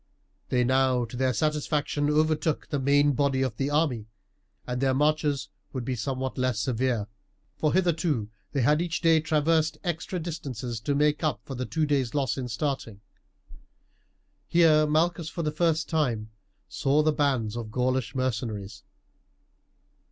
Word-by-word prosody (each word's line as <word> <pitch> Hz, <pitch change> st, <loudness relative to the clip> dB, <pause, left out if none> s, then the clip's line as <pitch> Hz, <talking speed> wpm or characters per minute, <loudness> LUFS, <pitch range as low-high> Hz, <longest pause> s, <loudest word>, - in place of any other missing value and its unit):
They 125 Hz, -1 st, +2 dB
now 130 Hz, -1 st, +2 dB
to 115 Hz, -, -10 dB
their 130 Hz, +1 st, +1 dB
satisfaction 150 Hz, +2 st, 0 dB
overtook 155 Hz, 0 st, +1 dB
the 145 Hz, -, -1 dB
main 145 Hz, +2 st, +4 dB
body 140 Hz, -1 st, +1 dB
of 130 Hz, -5 st, -3 dB
the 135 Hz, +1 st, 0 dB
army, 145 Hz, -8 st, 0 dB, 0.6 s
and 125 Hz, 0 st, -3 dB
their 135 Hz, -1 st, +2 dB
marches 150 Hz, -1 st, +1 dB, 0.2 s
would 130 Hz, -3 st, -4 dB
be 130 Hz, -, -1 dB
somewhat 130 Hz, +2 st, -3 dB
less 130 Hz, -3 st, 0 dB
severe, 120 Hz, -1 st, 0 dB, 0.5 s
for 150 Hz, 0 st, +1 dB
hitherto 165 Hz, -, +1 dB, 0.2 s
they 140 Hz, -, 0 dB
had 150 Hz, +6 st, +3 dB
each 170 Hz, -2 st, -2 dB
day 165 Hz, -1 st, +5 dB
traversed 155 Hz, 0 st, +1 dB
extra 175 Hz, +1 st, -3 dB
distances 130 Hz, -8 st, -5 dB
to 140 Hz, +5 st, -1 dB
make 150 Hz, +2 st, +2 dB
up 155 Hz, -, 0 dB
for 135 Hz, -, -7 dB
the 125 Hz, 0 st, -4 dB
two 160 Hz, -1 st, 0 dB
days' 140 Hz, -4 st, 0 dB
loss 140 Hz, -3 st, +1 dB
in 130 Hz, -2 st, -4 dB
starting. 120 Hz, -4 st, -3 dB, 1.5 s
Here 155 Hz, -3 st, +5 dB
Malchus 160 Hz, +1 st, +1 dB
for 170 Hz, 0 st, -4 dB
the 150 Hz, -, 0 dB
first 160 Hz, 0 st, +1 dB
time 120 Hz, -9 st, -1 dB, 0.4 s
saw 145 Hz, +3 st, +1 dB
the 155 Hz, 0 st, +3 dB
bands 130 Hz, -7 st, 0 dB
of 115 Hz, -2 st, -5 dB
Gaulish 125 Hz, -1 st, -1 dB
mercenaries. 110 Hz, -5 st, -3 dB
140 Hz, 150 wpm, -27 LUFS, 125-155 Hz, 1.5 s, day